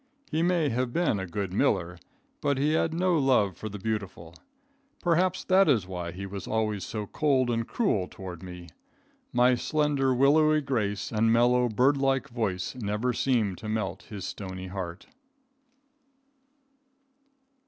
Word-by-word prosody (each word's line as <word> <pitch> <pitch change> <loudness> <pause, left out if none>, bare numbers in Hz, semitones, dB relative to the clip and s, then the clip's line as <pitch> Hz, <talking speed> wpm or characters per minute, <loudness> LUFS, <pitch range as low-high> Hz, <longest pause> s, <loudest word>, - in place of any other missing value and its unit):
He 160 +1 +1
may 170 -3 +2
have 125 0 -1
been 165 - +1
a 95 - -4
good 95 +1 -4
miller, 90 -2 0 0.4
but 140 -1 +1
he 150 +3 +1
had 160 0 +1
no 175 0 +1
love 125 -9 +2
for 110 - -6
the 105 - -7
beautiful. 100 -5 -4 0.7
Perhaps 180 +2 +2
that 190 -2 +4
is 115 -9 +3
why 90 -2 -5
he 95 +2 -7
was 100 -1 -7
always 110 -3 -1
so 105 -2 -4
cold 130 0 +1
and 115 -1 -1
cruel 105 - 0
toward 90 -3 -9
me. 90 -2 -9 0.6
My 125 +1 +4
slender, 145 +1 +1
willowy 155 +4 +4
grace 110 -8 -2
and 115 0 +2
mellow, 120 +1 +3
bird 130 +6 +3
like 135 0 0
voice 105 -7 -2
never 115 +1 -2
seemed 115 -7 0
to 110 - -6
melt 105 -5 -2
his 100 -3 -6
stony 95 -1 -6
heart. 90 -2 -6
115 Hz, 150 wpm, -27 LUFS, 95-140 Hz, 0.7 s, that